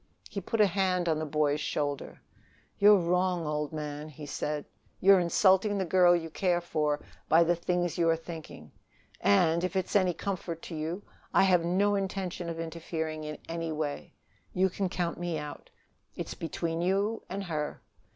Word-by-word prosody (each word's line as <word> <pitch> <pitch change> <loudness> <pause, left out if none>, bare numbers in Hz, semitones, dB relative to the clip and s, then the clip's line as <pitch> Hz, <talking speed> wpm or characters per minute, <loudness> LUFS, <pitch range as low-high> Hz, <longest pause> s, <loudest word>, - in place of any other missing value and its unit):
He 200 - -3
put 225 +5 -3
a 210 - +7
hand 185 -2 +1
on 160 -2 +1
the 155 - -3
boy's 150 0 +1
shoulder. 145 -1 -3 0.6
"You're 205 0 +8
wrong, 180 -1 +1
old 150 -1 -2
man," 150 -1 -5
he 150 0 -9
said. 150 +1 -3 0.3
"You're 195 0 +7
insulting 190 +3 +3
the 190 - 0
girl 175 0 +5
you 165 -2 -3
care 175 0 +1
for 150 -4 -1 0.3
by 165 +1 +6
the 175 +1 +2
things 175 0 -1
you 165 -1 +4
are 165 - +4
thinking. 160 - -9 0.5
And, 160 - +3
if 185 +1 -2
it's 190 +1 -1
any 185 -4 +3
comfort 175 -3 -4
to 165 - -6
you, 165 +6 -3 0.3
I - - +6
have 180 -3 +4
no 195 +4 +2
intention 190 -3 -2
of 165 0 -5
interfering 160 -1 -4
in 150 0 -5
any 165 0 -3
way. 150 -2 -4 0.4
You 190 0 +2
can 190 0 -1
count 175 -2 -2
me 175 -2 -2
out. 150 -1 -7 0.5
It's - - -5
between 165 0 -3
you 200 +5 +1
and 195 +2 -3
her." 155 -5 -4
170 Hz, 175 wpm, -29 LUFS, 155-185 Hz, 0.6 s, You're